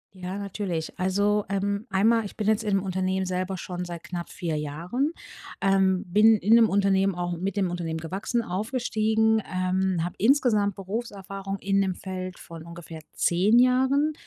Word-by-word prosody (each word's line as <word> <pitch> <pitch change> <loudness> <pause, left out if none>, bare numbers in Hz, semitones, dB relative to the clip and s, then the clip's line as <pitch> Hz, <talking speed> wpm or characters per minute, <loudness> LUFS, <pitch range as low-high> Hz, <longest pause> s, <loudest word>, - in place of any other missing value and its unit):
Ja, 185 +1 -5
natürlich. 195 -5 -4
Also, 205 +3 +1
ähm, 200 +3 -1
einmal, 220 +4 +3
ich 200 - -9
bin 210 - -2
jetzt 220 0 +2
im 195 -3 +1
Unternehmen 190 0 -1
selber 185 +1 -2
schon 180 0 -5
seit 170 -1 -7
knapp 175 -1 -6
4 165 -3 -3
Jahren. 170 - -2 0.5
Ähm, 190 -1 +2
bin 210 +4 +5
in 210 +4 +4
dem 230 -2 +6
Unternehmen 195 -1 +2
auch 175 0 -2
mit 190 +3 -3
dem 190 -3 +1
Unternehmen 165 -2 -3
gewachsen, 195 +8 -2
aufgestiegen, 220 +1 +1
ähm, 185 -1 0
habe 175 - -3
insgesamt 215 -4 +3
Berufserfahrung 195 -1 -5
in 195 +1 +1
dem 190 -2 -1
Feld 185 -1 -6
von 165 -1 -10
ungefähr 170 -1 -10
10 190 +7 +3
Jahren. 265 +4 +3
195 Hz, 160 wpm, -26 LUFS, 180-215 Hz, 0.5 s, dem